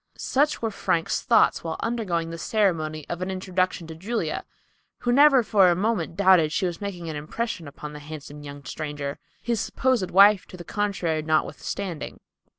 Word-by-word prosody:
Such 290 -1 +1
were 225 - 0
Frank's 165 -4 0
thoughts 230 -3 +3
while 165 -1 -3
undergoing 185 -8 -2
the 165 - -6
ceremony 160 -9 0
of 175 +1 -5
an 185 - -2
introduction 185 -2 -1
to 160 - -8
Julia, 205 +9 -3 0.6
who 245 - +1
never 275 -1 +6
for 200 -4 +5
a 175 - +3
moment 190 -4 -1
doubted 185 -5 +5
she 190 - 0
was 175 0 -3
making 180 -4 -5
an 160 - -4
impression 165 +3 -4
upon 150 +1 -8
the 150 - -8
handsome 150 -1 -9
young 145 -1 -9
stranger, 145 -1 -5 0.2
his 235 -2 0
supposed 225 -2 0
wife 200 +1 +6
to 185 - -11
the 175 - -8
contrary 185 -6 -1
notwithstanding. 160 +2 -2
180 Hz, 170 wpm, -25 LUFS, 155-210 Hz, 0.6 s, never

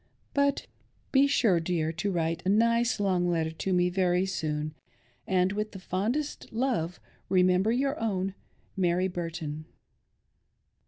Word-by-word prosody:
Be 275 +1 +5
sure, 225 -10 +3
dear, 160 -1 -1
to 165 +5 -2
write 165 -1 -1
a 185 - 0
nice 230 +3 +3
long 185 -3 +1
letter 165 -2 0
to 160 +4 -3
me 180 0 +3
very 180 0 +2
soon; 155 -5 -2 0.5
and 185 0 +2
with 210 -1 -4
fondest 220 +11 -2
love 225 -8 -1 0.3
remember 185 +2 +3
your 275 +4 0
own 195 -4 -1 0.4
Mary 180 -1 +2
Burton." 165 -4 -5
185 Hz, 120 wpm, -28 LUFS, 170-210 Hz, 0.5 s, Be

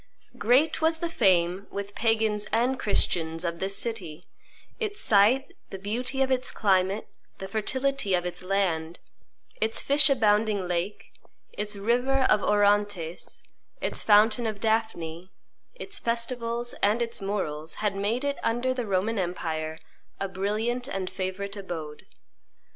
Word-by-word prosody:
Great 255 +10 +3
was 320 +1 +3
the 340 +1 -2
fame, 185 - +2
with 200 0 -6
Pagans 220 -2 +1
and 245 +3 +1
Christians, 165 -4 +1
of 170 0 -3
this 195 +1 +2
city; 180 -9 -3 0.6
its 415 -3 -3
site, 245 - +3
the 195 - -6
beauty 245 +7 -1
of 265 - -1
its 255 -1 +1
climate, 195 0 +1 0.3
the 195 - -6
fertility 220 +1 0
of 175 0 -1
its 180 - -4
land, 180 -4 -1 0.6
its 220 +1 +1
fish 285 0 +5
abounding 210 -6 +2
lake, 175 +3 -3 0.4
its 210 0 -2
river 245 +6 +1
of 210 - +4
Orontes, 205 -5 +1 0.4
its - - -2
fountain 215 +2 +4
of 215 -2 -4
Daphne, 190 -6 -1 0.4
its 400 -5 -5
festivals, 235 0 -2
and 210 +3 +3
its 235 -2 -2
morals, 165 -6 -3
had 210 -2 -1
made 210 +6 -1
it, 285 0 -1
under 240 +3 0
the 245 -3 -3
Roman 200 +3 0
empire, 160 -3 -3 0.4
a 195 - -1
brilliant 215 +6 -2
and 190 -8 -3
favorite 195 +2 -4
abode. 165 -6 -7
210 Hz, 135 wpm, -27 LUFS, 185-235 Hz, 0.6 s, fish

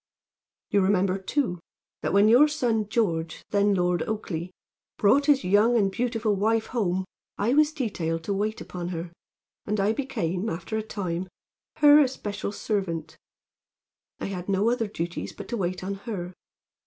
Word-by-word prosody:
"You 200 - +4
remember 190 0 +2
too, 190 -2 -1 0.4
that - - -1
when 200 +2 +5
your 250 +7 +7
son 235 -8 0
George, 170 -8 -1
then 205 -1 +3
Lord 180 -2 +1
Oakleigh, 185 -6 -3 0.5
brought 275 +8 +4
his 285 -5 +4
young 210 +6 +4
and 195 -3 +2
beautiful 225 -2 0
wife 220 +3 +1
home 190 -6 -1 0.3
I 225 +5 +1
was 305 +1 +4
detailed 175 - -2
to 200 - -1
wait 215 +2 -2
upon 175 -1 -6
her, 170 -1 -5 0.5
and 210 0 0
I 200 +2 +2
became, 195 - -2
after 170 +5 -4
a 220 - 0
time, 185 -4 -4 0.5
her 295 -1 +7
especial 215 -8 -1
servant. 175 -8 -3 1.0
I - - -4
had 185 -1 -5
no 200 +4 +2
other 235 -3 0
duties 175 -4 -4
but - - -9
to 240 - -2
wait 180 -2 -2
on 195 +1 -2
her. 195 -3 -6
200 Hz, 155 wpm, -26 LUFS, 180-225 Hz, 1.0 s, your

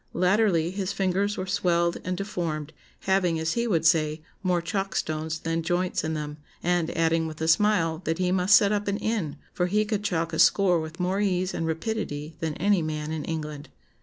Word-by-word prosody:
Latterly 180 -2 +2
his 190 0 -2
fingers 195 +1 0
were 185 - -2
swelled 175 -3 +1
and 185 0 -2
deformed, 165 -6 -3 0.3
having, 185 -4 +1
as 160 +1 0
he 235 0 0
would 165 -7 +1
say, 155 -1 +2 0.2
more 180 -2 +1
chalk 195 +4 -3
stones 155 +1 -2
than 165 0 -1
joints 175 +2 0
in 160 0 -2
them, 150 -1 -5 0.3
and 175 -2 +1
adding 165 0 +2
with 155 -1 -8
a 160 - -1
smile, 165 -2 +3
that 165 0 0
he 180 -1 +1
must 185 +2 +5
set 200 0 +5
up 205 -1 -1
an 200 0 0
inn, 210 -11 -2 0.2
for 180 - 0
he 210 +3 +1
could 210 -1 -2
chalk 165 -4 -1
a 160 - -2
score 185 -4 +5
with 160 +2 -7
more 185 +2 0
ease 185 -2 0
and 165 - -2
rapidity 160 -3 -3
than 160 -2 -2
any 195 +2 +2
man 155 -1 -3
in 160 -2 -3
England.... 150 -2 -5
175 Hz, 200 wpm, -26 LUFS, 160-195 Hz, 0.3 s, must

